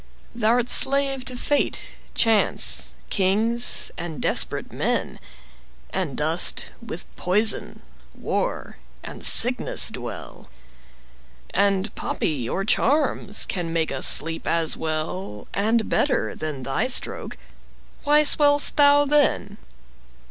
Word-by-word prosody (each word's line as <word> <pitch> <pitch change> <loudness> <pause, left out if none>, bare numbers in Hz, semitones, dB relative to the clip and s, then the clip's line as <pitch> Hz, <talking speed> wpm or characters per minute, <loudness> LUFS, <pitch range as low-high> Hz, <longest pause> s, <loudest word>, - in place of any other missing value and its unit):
Thou'rt 235 +1 +1
slave 275 0 +2
to 255 -1 -7
fate, 290 +3 -2 0.2
chance, 225 -3 +1 0.2
kings, 220 +5 +2
and 165 -3 -6
desperate - - -1
men, - - -2 0.7
And - - -4
dost - - -1
with - - -8
poison, 210 +5 +1 0.3
war, - - -4 0.3
and - - -9
sickness 250 - +4
dwell; - - -9 1.0
10 - - +2
And 195 +2 -4
poppy 135 -8 -3
or 195 - -3
charms 260 -4 0
can 175 -3 -4
make 165 -1 -1
us 135 - +1
sleep 165 +2 +2
as 165 -1 +2
well 155 - -5
And 220 +2 0
better 285 - 0
than 150 -4 -6
thy 135 - -1
stroke. 255 - 0 0.7
Why 300 +1 +4
swell'st 290 -1 +3
thou 290 0 +5
then? 285 -8 0
220 Hz, 110 wpm, -23 LUFS, 170-275 Hz, 1.0 s, thou